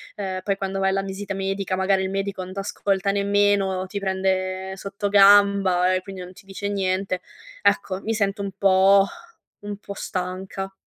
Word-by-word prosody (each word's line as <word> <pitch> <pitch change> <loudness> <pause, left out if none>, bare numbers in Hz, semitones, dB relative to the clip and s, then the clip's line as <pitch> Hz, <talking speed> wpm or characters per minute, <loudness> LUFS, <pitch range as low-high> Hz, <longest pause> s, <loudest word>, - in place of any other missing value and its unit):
ehm, 190 -2 -4
poi 200 -1 0
quando 195 0 -3
vai 190 0 +2
alla 195 0 0
visita 195 +1 -5
medica 195 0 -2
magari 190 0 +1
il 190 - -2
medico 195 -1 -3
non 185 +1 -9
t'ascolta 195 0 -1
nemmeno, 200 -1 +1
ti 200 +2 -4
prende 190 0 -1
sottogamba 200 -2 +4
e 185 - 0
quindi 190 -1 -9
non 180 0 -9
ti 195 - -17
dice 200 +1 -5
niente. 190 -1 -1 0.4
Ecco, 190 - +1
mi 225 - -2
sento 200 -1 -1
un 200 -1 -3
po' 195 0 +5 0.6
un 205 0 -5
po' 200 -1 -8
stanca. 190 +1 -5
195 Hz, 165 wpm, -23 LUFS, 190-200 Hz, 0.6 s, po